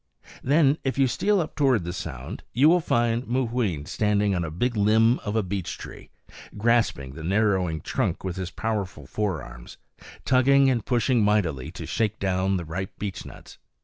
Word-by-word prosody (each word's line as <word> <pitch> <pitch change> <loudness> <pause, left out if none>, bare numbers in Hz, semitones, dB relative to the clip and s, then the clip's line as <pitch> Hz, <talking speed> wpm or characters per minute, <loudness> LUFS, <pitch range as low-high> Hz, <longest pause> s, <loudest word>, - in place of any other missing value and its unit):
Then, 145 +1 +3
if 135 0 -2
you 135 - +4
steal 200 - +1
up 160 - -3
toward 130 - +2
the 85 +1 -4
sound, 65 -8 -6
you 135 +6 +5
will 180 +2 +5
find 120 -5 0
Mooween 115 - -1
standing 105 +2 +1
on 90 -2 -1
a 80 - -3
big 120 +10 -1
limb 110 +3 +3
of 105 0 -4
a 110 - +2
beech 95 -1 -4
tree, - - -11 0.5
grasping 110 - +1
the 80 - -9
narrowing 95 -4 +1
trunk - - -2
with 95 -2 -3
his 95 -2 -4
powerful 100 -9 -4
forearms, 80 - -5 0.5
tugging 135 +1 +4
and 120 -3 -1
pushing 120 -1 +2
mightily 85 -10 +1
to - - -7
shake 110 -2 -1
down 95 0 0
the 85 - -5
ripe 90 +4 -5
beechnuts. 100 -3 -8
105 Hz, 170 wpm, -25 LUFS, 90-125 Hz, 0.5 s, you